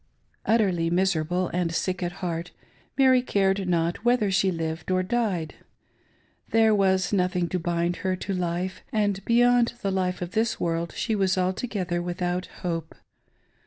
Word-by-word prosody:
Utterly 190 -7 +2
miserable 180 0 +1
and 175 -1 -1
sick 180 +2 -2
at 175 -1 -1
heart, 170 0 -3 0.5
Mary 260 -2 +5
cared 195 -4 +1
not 170 +3 0
whether 240 -4 +2
she 190 0 +2
lived 165 -1 -4
or 185 0 +2
died. 190 -6 -1 1.0
There 225 -1 +4
was 190 -2 +2
nothing 180 -2 +1
to 185 - -1
bind 170 +1 -1
her 185 -1 -1
to 195 +2 -4
life, 180 +1 -2
and 205 -3 0
beyond 240 0 +4
the 195 - 0
life 185 -1 -1
of 175 - -6
this 220 +2 0
world 170 0 -1
she 225 - -1
was 190 -2 +1
altogether 185 -1 -1
with 175 +1 -4
out 180 +1 -1 0.2
hope. 165 -2 -3
185 Hz, 155 wpm, -26 LUFS, 175-200 Hz, 1.0 s, Mary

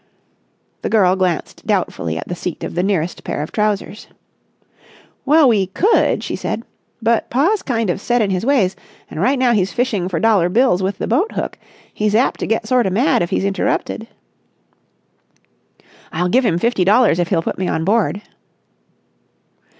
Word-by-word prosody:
The - - -3
girl 190 -4 +3
glanced 185 -3 -2
doubtfully 80 -1 -1
at - - -6
the - - -4
seat 175 -1 -5
of - - -5
the 175 - 0
nearest 180 -3 -1
pair - - -3
of 155 - -8
trousers. 210 0 -2 1.2
"Well, 305 0 +6
we 205 -6 +2
could," 390 - +2
she - - -3
said. 230 - -4 0.4
"But 230 0 +1
pa's 350 - +1
kind 230 -4 -1
of 190 - -5
set 240 +2 +1
in 205 -3 +1
his 185 +1 -1
ways, 230 -8 +2 0.4
and 155 - -4
right 265 +7 +2
now 255 -1 +3
he's 195 -3 +1
fishing 220 -8 -1
for 175 - -2
dollar 210 -6 +3
bills 230 -2 +2
with 190 +1 -2
the - - -3
boat 315 - 0
hook. - - -3 0.4
He's 210 0 0
apt 245 +4 +2
to - - -3
get 225 0 0
sorta 245 -4 +2
mad 220 - +2
if 170 - -1
he's - - -1
interrupted." 200 +2 -2 2.0
"I'll 180 +3 -1
give 250 +4 +3
him 170 -5 +1
fifty 230 0 +1
dollars 205 -2 +4
if 175 - +1
he'll 170 -4 0
put - - -4
me 185 - -1
on 160 -1 -1
board." 205 0 +1
205 Hz, 175 wpm, -18 LUFS, 180-240 Hz, 2.0 s, Well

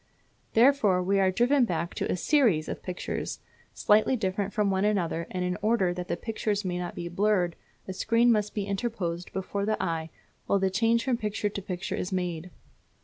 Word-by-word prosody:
Therefore 225 -7 +4
we 195 +2 +2
are 190 -1 +4
driven 245 +8 +3
back 170 -5 -1
to - - -2
a - - 0
series 220 - +3
of - - -5
pictures, 180 -1 -4 0.4
slightly 215 +5 +3
different 200 -2 -2
from 205 -1 +1
one 190 0 +1
another; 175 -5 0
and 180 -1 -2
in 180 +2 -2
order 210 -5 +2
that 180 0 -5
the - - -2
pictures 215 -1 -2
may 180 -1 -2
not 175 -1 -5
be 170 - -5
blurred 180 -1 +1 0.3
a 190 - -4
screen 230 +5 +3
must 210 -2 0
be 205 -2 -1
interposed 195 -4 -3
before 195 +1 -3
the 215 +1 0
eye 165 -3 -2 0.4
while 200 - +3
the 190 -1 +1
change 230 +3 +2
from 255 -3 0
picture 210 -2 -2
to 200 - -5
picture 180 -1 -4
is 180 - -3
made. 180 -2 -3
195 Hz, 195 wpm, -28 LUFS, 180-215 Hz, 0.4 s, Therefore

